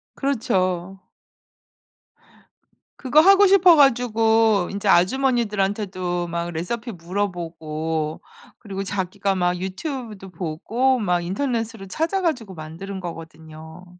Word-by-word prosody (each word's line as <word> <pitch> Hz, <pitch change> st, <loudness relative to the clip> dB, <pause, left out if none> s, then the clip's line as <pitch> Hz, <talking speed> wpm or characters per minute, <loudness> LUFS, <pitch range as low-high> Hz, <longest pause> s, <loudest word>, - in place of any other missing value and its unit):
그렇죠. 190 Hz, -8 st, -1 dB, 2.0 s
그거 275 Hz, +3 st, +3 dB
하고 395 Hz, +3 st, +6 dB
싶어 370 Hz, -3 st, +6 dB
가지고 225 Hz, -, +3 dB
인제 200 Hz, +1 st, -4 dB
아주머니들한테도 195 Hz, -4 st, +1 dB
막 170 Hz, 0 st, -3 dB
레시피 225 Hz, +9 st, -4 dB
물어보고 165 Hz, -4 st, -4 dB, 0.4 s
그리고 195 Hz, -3 st, -5 dB
자기가 195 Hz, 0 st, -2 dB
막 180 Hz, -1 st, 0 dB
유튜브도 210 Hz, -, -6 dB
보고 195 Hz, +10 st, -1 dB
막 180 Hz, -5 st, 0 dB
인터넷으로 225 Hz, 0 st, -3 dB
찾아 330 Hz, -, -1 dB
가지고 250 Hz, -, -2 dB
만들은 170 Hz, +5 st, -8 dB
거거든요. 160 Hz, -1 st, -10 dB
195 Hz, 260 characters per minute, -22 LUFS, 175-235 Hz, 2.0 s, 하고